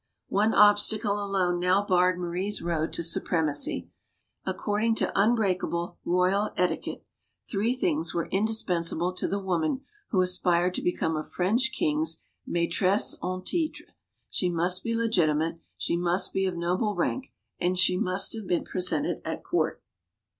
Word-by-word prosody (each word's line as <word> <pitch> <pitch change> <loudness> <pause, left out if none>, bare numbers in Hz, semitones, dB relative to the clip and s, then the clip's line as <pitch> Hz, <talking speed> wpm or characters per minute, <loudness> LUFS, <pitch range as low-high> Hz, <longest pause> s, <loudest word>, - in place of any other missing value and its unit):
One 210 +3 +2
obstacle 205 0 +4
alone 185 -3 0
now 185 +3 +2
barred 180 -1 +3
Marie's 180 +4 -2
road 165 -2 -2
to 170 - -1
supremacy. 160 -3 +1 0.6
According 220 +2 0
to - - 0
unbreakable 195 -5 +1
royal 185 +4 +2
etiquette, 180 0 -2 0.4
three 225 +4 0
things 165 -8 0
were 170 -1 -1
indispensable 180 -4 0
to - - -2
the 200 - -1
woman 185 - -1 0.3
who 190 - +1
aspired 180 -1 +2
to - - -3
become 160 -2 -1
a 155 - -2
French 225 +12 0
king's 155 +2 0 0.3
maitresse 175 +4 +1
en 185 0 -3
litre 325 -3 -2 0.5
she 180 - 0
must 175 +2 +1
be 230 0 -1
legitimate, 165 -8 +1 0.2
she - - 0
must 175 +2 +1
be 190 0 +1
of 180 -2 -3
noble 185 +5 0
rank, 265 0 -2 0.3
and 180 +1 0
she 185 0 +4
must 185 +2 +2
have 220 -4 -6
been 175 - 0
presented 180 -4 -1
at - - -5
court. - - -1
180 Hz, 145 wpm, -27 LUFS, 170-205 Hz, 0.6 s, obstacle